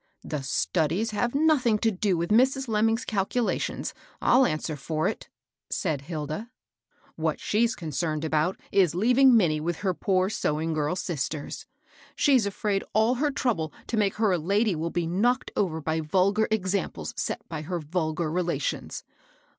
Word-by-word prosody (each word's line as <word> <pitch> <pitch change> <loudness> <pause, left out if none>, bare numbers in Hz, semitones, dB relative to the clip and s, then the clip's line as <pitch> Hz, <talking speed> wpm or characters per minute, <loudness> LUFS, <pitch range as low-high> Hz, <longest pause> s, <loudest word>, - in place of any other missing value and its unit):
" - - -37
The 150 - -1
studies 155 - 0
have 240 +4 -1
nothing 280 -7 +3
to 225 +1 +1
do 190 -2 0
with 170 +4 -2
Mrs. 265 +4 +3
Lemming's^ 225 +2 +1
calculations, 215 +3 -1 0.3
I'll 255 +1 +5
answer 155 0 -2
for 155 +3 -1
it - - -4
I - - -58 0.2
" - - -65
said 155 -8 -1
Hilda. 155 +7 -5 0.7
"What - - -1
she's 230 +2 +1
concerned 155 -1 -2
about 160 +4 0
is 180 -5 +3
leaving 250 +5 +5
Minnie 160 -7 +2
with 170 +2 -1
her 185 - +2
poor 185 +2 +1
sewing 160 -4 -1
girl 155 +2 0
sisters. 155 -5 -4 0.5
She's 260 -7 +3
afraid 200 0 -1
all 220 +3 +3
her 300 - +3
trouble 230 - -1
to - - -3
make 205 -3 +1
her 215 -2 +2
a 180 - +1
lady 200 +6 +1
will 160 +2 -2
be 170 0 -1
knocked 230 +10 +1
over 170 -5 0
by 160 +1 -1
vulgar 190 +7 +2
examples 190 - -2
set - - -3
by 160 -2 -5
her 175 +3 -3
vul 160 0 -2
gar 155 -1 -2
relations. 180 - -2
185 Hz, 170 wpm, -26 LUFS, 160-220 Hz, 0.7 s, I'll